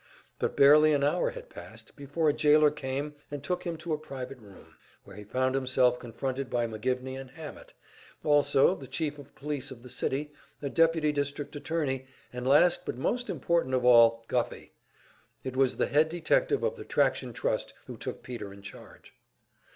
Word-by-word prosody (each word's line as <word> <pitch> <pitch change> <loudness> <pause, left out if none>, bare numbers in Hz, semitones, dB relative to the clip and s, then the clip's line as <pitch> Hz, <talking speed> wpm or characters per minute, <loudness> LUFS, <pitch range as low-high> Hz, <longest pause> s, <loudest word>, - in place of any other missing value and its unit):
But - - -2
barely 150 +2 +7
an 140 -1 +1
hour 150 +5 +2
had - - -9
passed - - -12
before 145 +2 -2
a 150 - +4
jailer 150 0 +5
came, 140 +1 -4 0.2
and 145 -1 -6
took 180 +3 -2
him 170 -1 -3
to 165 0 -4
a 150 - -1
private 135 -3 -7
room, 100 -4 -16 0.3
where 100 - -13
he 105 - -9
found 130 +5 0
himself 130 -2 +2
confronted 130 +3 -4
by 120 -1 0
McGivney 125 +4 -3
and 135 - -11
Hammett, 150 +2 -10 0.5
also 145 +1 +4
the 140 -8 -9
Chief 150 -1 -3
of 140 - -14
Police 145 -2 -4
of 125 -3 -11
the 125 - -10
city, 145 +2 -2 0.3
a 140 - -3
deputy 165 -2 +3
district 145 +1 -3
attorney, 145 -4 -2 0.3
and 125 +1 -4
last 170 +6 +5
but - - -5
most 245 - -1
important 165 -4 0
of 125 -1 0
all 115 -2 +6
Guffey. 125 -2 -2 0.7
It 130 -1 -5
was 130 -1 +2
the - - +2
head 155 +2 +3
detective 425 - +1
of 475 0 -1
the 420 - -7
Traction - - +1
Trust - - -2
who - - -8
took - - -7
Peter 120 -6 -7
in 100 0 -13
charge. 100 - -13
140 Hz, 180 wpm, -29 LUFS, 130-155 Hz, 0.7 s, barely